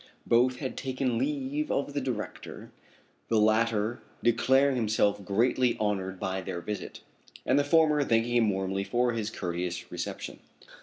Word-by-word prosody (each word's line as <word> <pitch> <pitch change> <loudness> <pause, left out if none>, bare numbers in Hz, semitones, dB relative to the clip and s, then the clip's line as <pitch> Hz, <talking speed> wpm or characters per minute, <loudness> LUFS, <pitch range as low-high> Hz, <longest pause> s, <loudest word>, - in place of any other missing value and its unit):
Both 125 +2 +3
had 130 0 -5
taken 130 -3 -1
leave 145 +2 -2
of 140 +1 -1
the 145 - -1
director, 125 -5 -6 0.6
the 115 - +2
latter 110 +1 +2 0.2
declaring 130 +4 +3
himself 105 -3 +1
greatly 120 +5 +2
honored 95 -3 -1
by 95 0 -2
their 85 - -5
visit, 105 +3 -6 0.4
and 130 +3 +3
the - - +3
former 150 0 +4
thanking 115 -1 +1
him 115 -3 +4
warmly 95 0 -1
for 120 +3 +1
his 110 -2 -2
courteous 90 -4 -4
reception. - - -5
115 Hz, 145 wpm, -28 LUFS, 105-130 Hz, 0.6 s, former